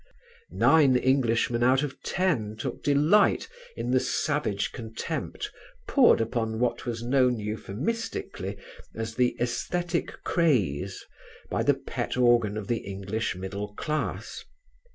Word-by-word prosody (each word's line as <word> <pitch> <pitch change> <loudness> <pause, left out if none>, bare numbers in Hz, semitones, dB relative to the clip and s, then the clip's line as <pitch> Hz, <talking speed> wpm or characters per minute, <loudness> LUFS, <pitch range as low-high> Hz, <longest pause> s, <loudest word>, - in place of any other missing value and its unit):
Nine 145 -5 +5
Englishmen 120 -2 +2
out 130 +3 +4
of 145 -3 -5
ten 135 - 0
took - - -4
delight 155 - +3 0.3
in 125 - -3
the 130 - +4
savage 140 -9 -1
contempt 110 -1 -5 0.4
poured - - +5
upon 115 -1 -1
what 120 +1 -1
was 115 -1 -3
known 125 0 +3
euphemistically 110 - -4 0.4
as 110 0 -4
"the 125 +1 +1
æsthetic 170 +8 -2
craze" 100 - +1 0.5
by - - 0
the - - +3
pet - - -4
organ 120 -4 +3
of 105 - -4
the 120 - +1
English 100 +2 -3
middle 100 +3 -5
class. 155 +5 -3
120 Hz, 120 wpm, -27 LUFS, 110-140 Hz, 0.5 s, Nine